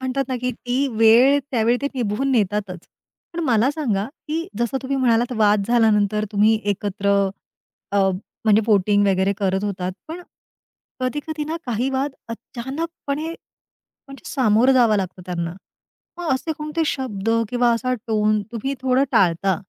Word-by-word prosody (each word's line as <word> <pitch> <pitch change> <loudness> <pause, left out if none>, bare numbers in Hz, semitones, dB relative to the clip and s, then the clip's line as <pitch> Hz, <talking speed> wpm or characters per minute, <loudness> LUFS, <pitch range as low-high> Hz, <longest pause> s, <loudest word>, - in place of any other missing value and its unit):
म्हणतात 260 +1 -1
ना, 255 - -1
की 250 0 -1
ती 250 +4 -1
वेळ 235 +6 +6
त्यावेळी 235 -1 +2
ते 280 - +1
निभवून 245 +2 -1
नेतातच. 205 -4 0 0.5
पण 340 - -4
मला 240 -1 +3
सांगा, 245 -11 -1 0.2
की 325 +2 -2
जसं 235 +2 0
तुम्ही 275 +1 -2
म्हणालात 240 -1 +2
वाद 210 -1 +3
झाल्यानंतर 215 -3 +3
तुम्ही 215 +2 +3
एकत्र 200 0 -2 0.8
अ, - - +1 0.5
म्हणजे 215 -1 +5
पोटिंग 205 -1 +3
वगैरे 190 0 +2
करत 195 0 0
होतात. 185 -2 -3 0.2
पण 340 +3 -7 0.8
कधी-कधी 295 +4 -3
ना 320 +2 -3
काही 240 +2 -1
वाद 270 +2 -1 0.2
अचानकपणे, 280 +6 -5 0.8
म्हणजे 275 0 -11
सामोरं 250 0 +3
जावं 235 -4 +4
लागतो 185 -1 -4
त्यांना. 170 -2 -3 0.6
मग 345 -5 -2
असे 265 +5 -2
कोणते 305 +2 -2
शब्द 225 -8 -2 0.2
किंवा 245 -1 +2
असा 255 +2 -1
टोन 215 -1 +2
तुम्ही 240 +4 -3
थोडं 260 +1 +2
टाळता. 185 +1 +2
235 Hz, 145 wpm, -21 LUFS, 205-270 Hz, 0.8 s, वेळ